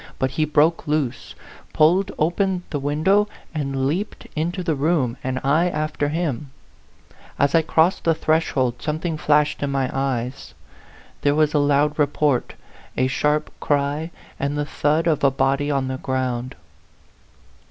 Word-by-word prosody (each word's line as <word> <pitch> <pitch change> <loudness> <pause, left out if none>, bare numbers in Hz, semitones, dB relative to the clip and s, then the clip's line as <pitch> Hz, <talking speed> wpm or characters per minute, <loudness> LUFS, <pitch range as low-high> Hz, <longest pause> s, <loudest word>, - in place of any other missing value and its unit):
But 130 0 0
he 155 +3 0
broke 155 +2 +2
loose, 145 -4 -2 0.4
pulled 180 +6 +3
open, 180 +3 0
the 145 - -1
window, 160 +9 +2 0.3
and 135 -3 -2
leaped 180 +10 -3
into 175 +4 -2
the 165 -2 0
room, 140 -4 +1
and 130 0 -2
I 155 +6 +3
after 150 -2 -2
him, 150 -3 -2 0.9
As 140 0 +2
I 165 - +5
crossed 160 +3 +2
the 165 -1 +3
threshold, 145 -6 0
something 155 +2 -2
flashed 150 -1 +2
in 140 - -1
my 135 -2 -1
eyes; 130 -1 -3 0.7
there 145 0 +2
was 155 -1 +2
a 150 - +3
loud 145 +1 +2
report, 145 -3 +1 0.4
a 130 - +3
sharp 150 +3 0
cry, 145 +2 0 0.3
and 140 +1 -1
the 145 - -1
thud 150 +2 0
of 160 -4 +1
a 140 - +6
body 135 +2 0
on 135 -2 0
the 130 0 -3
ground. 130 -1 -2
150 Hz, 150 wpm, -22 LUFS, 135-160 Hz, 0.9 s, a